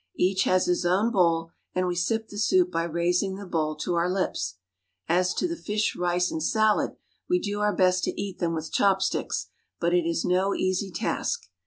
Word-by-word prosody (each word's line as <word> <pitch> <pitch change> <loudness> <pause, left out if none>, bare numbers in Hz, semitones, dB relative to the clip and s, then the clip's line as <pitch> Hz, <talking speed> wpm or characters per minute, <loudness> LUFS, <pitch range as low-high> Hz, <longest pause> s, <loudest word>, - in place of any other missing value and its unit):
Each 190 +1 +2
has 185 0 +3
his 180 0 +1
own 190 +6 +2
bowl, 165 -5 +2 0.2
and 185 0 +1
we 180 - 0
sip 220 +6 -1
the 205 - -7
soup 360 - +3
by 165 - 0
raising 175 +3 0
the 200 +1 -8
bowl 155 -4 -1
to 155 +4 -3
our 170 +1 +1
lips. 180 - -1 0.5
As 180 +2 +2
to - - 0
the 340 - -3
fish, 210 -8 -1
rice, 180 0 0
and 160 - -3
salad, 215 +5 +2 0.3
we 360 - +4
do 205 - -3
our 210 0 +1
best 185 -1 +3
to - - -3
eat 195 -2 -4
them 165 -2 0
with 160 0 -5
chopsticks, 190 -1 +1 0.3
but 170 0 +1
it 175 -2 +2
is 165 - -1
no 185 +2 +2
easy 185 +1 0
task. 470 - -2
185 Hz, 200 wpm, -26 LUFS, 170-205 Hz, 0.5 s, we